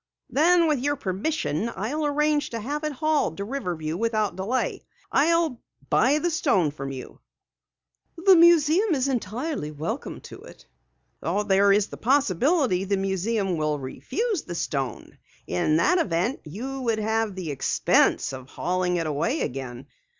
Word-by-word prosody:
"Then 335 +3 +4
with 300 -4 +1
your 290 +3 0
permission, 215 - -2
I'll 295 +9 -2
arrange 300 0 +1
to 230 - -4
have 290 +7 -4
it 305 - -1
hauled 295 - 0
to 200 - -3
Riverview 180 - -3
without 215 -2 0
delay. 205 +8 -2 0.3
I'll 320 -3 +2 0.3
buy 270 +5 +4
the 345 +3 0
stone 230 - +2
from 135 -2 -6
you." 130 -1 -9 1.0
"The 375 +3 +6
museum 340 +3 +5
is 265 0 0
entirely 245 - -3
welcome 155 +2 -5
to - - -11
it." - - -14 0.6
"There 200 +2 +2
is 205 +1 +2
a - - -6
possibility 260 - +2
that 200 +1 0
the - - -2
museum 195 0 -1
will 155 -1 0
refuse 305 - -3
the 175 - -7
stone. 135 -7 -4 0.3
In 155 - +1
that 360 - +3
event 195 - 0
you 255 - -6
would 230 -3 0
have 220 -1 -1
the 180 -5 -4
expense 135 0 +2
of 130 0 -9
hauling 180 +2 -1
it 165 -2 -1
away 160 - -1
again. 125 -1 -5
220 Hz, 150 wpm, -25 LUFS, -, 1.0 s, The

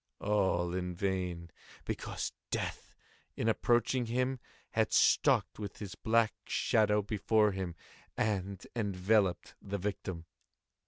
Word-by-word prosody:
All 95 -4 +1
in 90 -1 -2
vain; 90 -3 -2 0.3
because - - -3 0.2
Death, - - -4 0.4
in 110 - -1
approaching 120 +2 +2
him 125 +2 0 0.3
had - - +1
stalked - - +4
with 100 -2 -6
his 100 -3 -6
black 115 0 +2
shadow 105 -1 +2
before 105 +1 +2
him, 95 -3 -4 0.4
and 100 -2 -1
enveloped 100 -3 +1
the 100 0 -3
victim. 95 -3 -4
100 Hz, 110 wpm, -32 LUFS, 90-110 Hz, 0.4 s, stalked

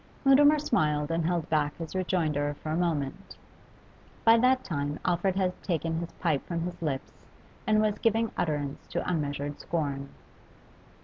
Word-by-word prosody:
Mutimer 290 +3 +7
smiled 150 - +1
and 165 -1 0
held 170 -2 0
back 150 -2 0
his 165 -2 -6
rejoinder 155 -6 0
for 155 - -3
a - - 0
moment. 170 +1 -2 0.9
By 225 0 +8
that 255 +2 +3
time 145 -3 -2
Alfred 180 +1 +1
had 185 -2 -1
taken 165 -2 -1
his 170 0 -5
pipe 155 -6 0
from 170 -1 -2
his 175 +1 -5
lips 140 -5 -3 0.6
and 215 0 +4
was 210 -1 0
giving 225 0 +2
utterance 145 -3 -2
to - - -3
unmeasured 145 -3 -2
scorn. 140 -4 -2
165 Hz, 150 wpm, -28 LUFS, 150-190 Hz, 0.9 s, By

